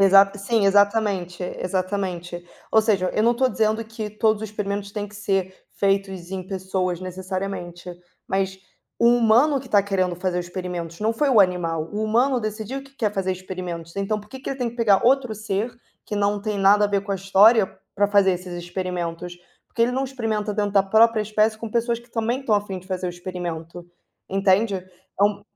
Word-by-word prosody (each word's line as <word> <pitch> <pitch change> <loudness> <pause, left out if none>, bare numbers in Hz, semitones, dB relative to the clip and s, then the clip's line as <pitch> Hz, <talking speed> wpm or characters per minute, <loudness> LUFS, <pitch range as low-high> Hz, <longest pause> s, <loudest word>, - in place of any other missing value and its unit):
Exato, 195 +1 +6
sim, 205 +2 +1
exatamente, 200 -3 +2 0.2
exatamente. 185 -2 -3 0.3
Ou 220 - +6
seja, 200 -4 +1
eu 215 - +2
não 235 +2 +4
tô 260 +2 +2
dizendo 220 -1 0
que 220 -1 -6
todos 215 0 +1
os 220 - -4
experimentos 200 -1 -4
têm 205 0 -4
que 210 - -16
ser 195 -2 -1 0.2
feitos 195 -3 -1
em 190 -1 -5
pessoas 185 -2 -2
necessariamente, 185 -1 -5 0.4
mas 190 0 -1 0.4
o 235 - +4
humano 240 +4 +4
que 260 - -12
tá 205 -1 +4
querendo 185 -3 0
fazer 180 0 -1
experimentos, 175 -2 -5
não 220 +2 +1
foi 285 +6 +1
o 240 -6 +6
animal, 165 -4 +1
o 210 +1 -2
humano 245 +4 +2
decidiu 220 +5 -4
que 275 0 -19
quer 210 -5 0
fazer 190 -1 -1
experimentos. 180 -3 -6
Então, 200 +2 -1
por 210 - -17
que 265 - -9
que - - -7
ele 270 - -4
tem 245 -2 -1
que 240 - -15
pegar 215 -4 +3
outro 250 -2 +3
ser, 215 +2 -3 0.3
que 210 - -3
não 205 0 +1
tem 210 0 -2
nada 200 +2 +5
a - - +1
ver 200 -1 0
com 200 0 -3
a - - +1
história, 195 +3 +5 0.3
pra 205 0 +2
fazer 200 -2 +4
esses 180 0 -5
experimentos? 175 -1 -4 0.3
Por - - -41
que 230 - +2
ele 240 +2 +2
não 265 +2 0
experimenta 220 -5 -2
dentro 205 -1 -1
da 200 -1 +5
própria 220 +3 +4
espécie 215 +1 +1
com 230 0 -6
pessoas 235 +1 0
que 235 0 -20
também 235 +3 -1
estão 240 -6 +1
a 205 0 0
fim 190 -2 -5
de 185 - -15
fazer 185 -1 -3
o - - -2
experimento? 175 -1 -6 0.4
Entende? 195 +2 +2
É 185 +2 -4
um 205 0 0
200 Hz, 200 wpm, -23 LUFS, 185-220 Hz, 0.4 s, Exato